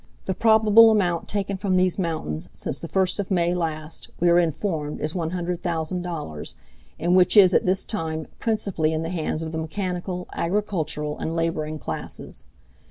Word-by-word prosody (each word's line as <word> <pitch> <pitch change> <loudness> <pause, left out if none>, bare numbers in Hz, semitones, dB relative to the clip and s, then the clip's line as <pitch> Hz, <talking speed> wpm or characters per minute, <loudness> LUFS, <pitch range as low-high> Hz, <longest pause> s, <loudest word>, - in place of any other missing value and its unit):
The 190 - 0
probable 220 +2 +6
amount 180 -6 +1
taken 200 -1 -2
from 190 -1 +1
these 185 +1 +2
mountains 155 - -3
since - - -2
the - - -6
first 190 +1 +1
of 200 - -2
May 175 -2 +2
last, 160 -2 -3
we 175 - +4
are 170 - +6
informed 160 -2 -1
is 155 +1 -2
$100,000, 170 - -3 0.4
and 175 +2 +2
which 185 +3 +5
is 190 -3 +8
at - - +3
this 185 +1 +2
time 160 -6 -3
principally 200 -8 0
in 160 +1 -1
the 165 - -3
hands 165 -2 -2
of 160 - -5
the 160 - -3
mechanical, 180 +2 -3
agricultural 170 -6 -2
and 165 - -3
laboring 160 -2 -1
classes. 80 - -6
175 Hz, 165 wpm, -24 LUFS, 160-190 Hz, 0.4 s, is